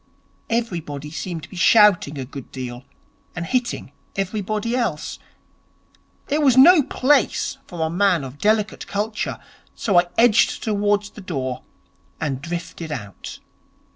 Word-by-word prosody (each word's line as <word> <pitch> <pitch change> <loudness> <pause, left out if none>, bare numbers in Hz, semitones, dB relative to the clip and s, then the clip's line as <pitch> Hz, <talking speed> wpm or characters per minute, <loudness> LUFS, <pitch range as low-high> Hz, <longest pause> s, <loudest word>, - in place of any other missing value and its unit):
Everybody 170 -11 -3
seemed 165 -1 -5
to - - -10
be - - -11
shouting 185 -6 +5
a 130 - -4
good 135 0 -10
deal 125 -1 -7 0.5
and 175 -1 -3
hitting 250 +4 -2 0.2
everybody 210 +4 -2
else. 215 -12 -2 1.1
It 295 +2 +1
was 265 -4 +4
no 320 +5 +9
place 275 0 +1
for 175 -3 -7
a - - -1
man 180 -3 +2
of 135 +2 -9
delicate 215 0 +1
culture, 210 +2 -2 0.4
so 195 -6 +3
I 175 - +1
edged 230 -2 +4
towards 205 -1 0
the - - -11
door, 135 -9 -4 0.6
and 135 -4 -2
drifted 170 0 -6
out. 105 -9 -7
195 Hz, 135 wpm, -22 LUFS, 150-220 Hz, 1.1 s, no